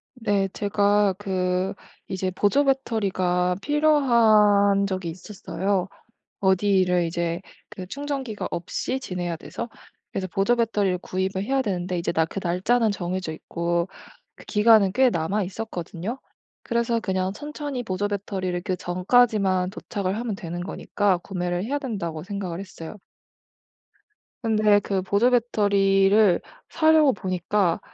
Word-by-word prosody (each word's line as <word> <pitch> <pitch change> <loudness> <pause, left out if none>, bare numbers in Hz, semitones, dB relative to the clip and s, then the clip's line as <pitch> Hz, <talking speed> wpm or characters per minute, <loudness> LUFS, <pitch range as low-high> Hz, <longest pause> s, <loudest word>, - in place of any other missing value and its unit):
네. 205 -5 0
제가 205 0 +2
그 185 -2 -1 0.3
이제 185 0 -2
보조배터리가 200 -6 +1
필요한 220 -9 +4
적이 185 -3 -3
있었어요. 185 +1 -3 0.5
어디를 190 -2 +3
이제 170 +1 -2 0.3
그 195 -3 -8
충전기가 270 -2 -4
없이 255 +9 -3
지내야 175 -7 -4
돼서. 235 +8 -7 0.4
그래서 190 -1 -3
보조배터리를 205 -1 +1
구입을 190 +1 -2
해야 270 +5 +1
되는데 185 -5 -2
이제 170 - -1
나 160 -1 +2
그 180 - -6
날짜는 210 +6 +2
정해져 185 -2 -3
있고 170 +2 -2 0.5
그 - - -14
기간은 210 -2 +4
꽤 255 +2 +4
남아있었거든요. 190 +3 -3 0.4
그래서 235 -1 0
그냥 190 -2 -1
천천히 290 +1 -5
보조배터리를 190 -3 -3
그 185 -3 -1
전까지만 185 0 +2
도착을 200 -1 -3
하면 230 -2 -3
되는 175 -1 -6
거니까 195 0 0
구매를 180 0 -3
해야 280 +6 -1
된다고 195 - -4
생각을 190 -2 -5
했어요. 185 -1 -9 1.5
근데 215 -2 +4
그 195 -1 -2
보조 200 +6 +2
배터리를 200 -4 +3 0.3
사려고 315 -3 +4
보니까 185 -1 0
195 Hz, 295 characters per minute, -24 LUFS, 180-220 Hz, 1.5 s, 필요한